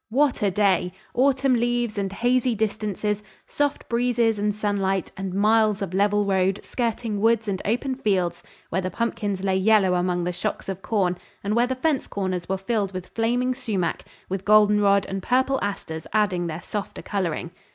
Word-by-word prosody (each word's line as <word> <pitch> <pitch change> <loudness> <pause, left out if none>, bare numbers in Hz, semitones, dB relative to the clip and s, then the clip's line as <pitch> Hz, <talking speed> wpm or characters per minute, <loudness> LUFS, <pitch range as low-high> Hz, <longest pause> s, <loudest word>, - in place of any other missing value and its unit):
What 270 +3 +2
a 205 - +3
day! 185 -2 +2 0.2
Autumn 270 +1 +3
leaves 240 -1 0
and 195 -2 -2
hazy 245 +3 +1
distances, 210 -1 -1 0.2
soft 290 -1 -1
breezes 235 -2 +1
and 205 0 0
sunlight, 195 -3 -1
and 190 -1 -4
miles 210 +1 +3
of 185 - -5
level 205 +1 +2
road 190 0 +1
skirting 230 -3 -2
woods 225 0 +3
and 190 -2 -2
open 245 +5 0
fields 185 -9 0 0.3
where 190 - 0
the 185 - -2
pumpkins 205 -3 -2
lay 190 -1 +2
yellow 195 -1 +4
among 180 0 0
the 180 +1 -2
shocks 180 - -3
of 195 -1 -4
corn, 185 -5 0 0.2
and 205 +2 0
where 240 +1 +3
the 260 - -1
fence 285 +1 0
corners 185 -3 -3
were 190 - 0
filled 200 0 -1
with 185 -1 -6
flaming 245 +3 0
sumac, 210 -10 -2 0.2
with 190 0 -3
goldenrod 210 -1 +5
and 195 0 -4
purple 260 +5 +2
asters 160 -6 -4
adding 190 -5 +1
their 165 +1 -5
softer 205 -2 -5
coloring. 175 -4 -2
205 Hz, 170 wpm, -24 LUFS, 190-230 Hz, 0.3 s, goldenrod